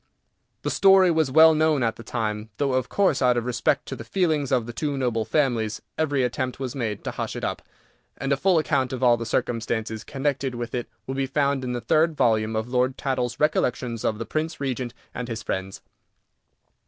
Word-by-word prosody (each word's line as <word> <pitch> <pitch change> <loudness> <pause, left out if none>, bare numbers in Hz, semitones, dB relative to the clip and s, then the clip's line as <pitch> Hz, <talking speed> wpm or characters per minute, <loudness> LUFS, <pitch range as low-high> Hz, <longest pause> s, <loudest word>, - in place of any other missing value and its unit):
The - - -1
story 190 -2 +6
was 160 -4 +2
well 160 +4 +7
known 155 -3 +2
at 115 -1 0
the - - -10
time, 110 -2 -3
though, 140 -2 0
of 130 -1 0
course, 195 -9 +2
out 125 -1 +4
of 120 - -1
respect 120 -3 0
to - - -5
the - - -8
feelings 155 -7 0
of 125 -4 +2
the 120 - -7
two 145 +2 -2
noble 120 -4 0
families, 120 -8 0 0.2
every 145 -4 +1
attempt 125 +1 -2
was 130 -2 -3
made 110 -6 -3
to - - -3
hush - - -4
it - - -6
up, - - -2 0.6
and 135 +1 0
a - - +3
full 180 +5 +3
account 140 -5 +1
of 130 0 -3
all 120 -1 +6
the 115 -1 -5
circumstances 110 -1 -2
connected 135 0 -2
with 120 -1 -5
it 120 -1 -3 0.2
will 135 - -4
be 135 0 -1
found 140 -1 0
in 125 -1 -2
the 120 - -3
third 155 +6 +2
volume 110 -1 +2
of 110 +1 -1
Lord 125 +1 0
Tattle's 130 -3 -2
Recollections 125 -6 0
of 110 - 0
the 115 - -4
Prince 160 +4 -3
Regent 130 -3 -3 0.2
and 125 - -5
his 115 -2 -5
Friends. 95 0 -4
130 Hz, 210 wpm, -24 LUFS, 115-145 Hz, 0.6 s, well